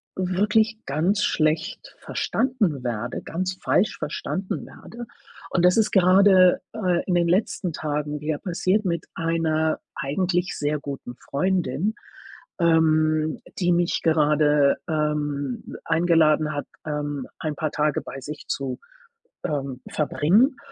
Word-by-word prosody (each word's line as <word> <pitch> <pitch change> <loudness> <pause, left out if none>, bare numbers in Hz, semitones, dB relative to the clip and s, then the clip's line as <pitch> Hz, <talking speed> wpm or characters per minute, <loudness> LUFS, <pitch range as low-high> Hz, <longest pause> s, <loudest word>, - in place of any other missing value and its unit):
wirklich 210 +4 +1
ganz 175 +9 +1
schlecht 160 +4 -1
verstanden 210 - -1
werde 120 -1 -3
ganz 185 +2 -3
falsch 205 - +2
verstanden 190 +1 -4
werde. 235 0 -10 0.4
Und 175 -1 +2
das 180 - +5
ist 220 -2 +3
gerade, 185 -1 +5
äh, 180 -6 0
in 180 - +1
den 170 -1 +3
letzten 180 -1 0
Tagen 150 -1 -3
wieder 150 0 -2
passiert 185 +4 0
mit 170 -2 -1
einer 160 -1 0 0.2
eigentlich 175 +5 -1
sehr 150 +1 -1
guten 140 -3 -7
Freundin, 180 - -1 0.6
ähm, 155 -2 +3 0.2
die 180 -2 +2
mich 175 0 +1
gerade, 150 -2 +3
ähm, 150 -4 -2
eingeladen 160 -2 +3
hat, 145 - -4 0.2
ähm, 145 -3 -3
ein 155 -2 -3
paar 155 +1 -2
Tage 150 -1 0
bei 135 - -8
sich 150 +3 -8
zu, 135 -2 -3 0.7
ähm, 135 -4 -3
verbringen. 195 - +2
160 Hz, 120 wpm, -24 LUFS, 150-185 Hz, 0.7 s, das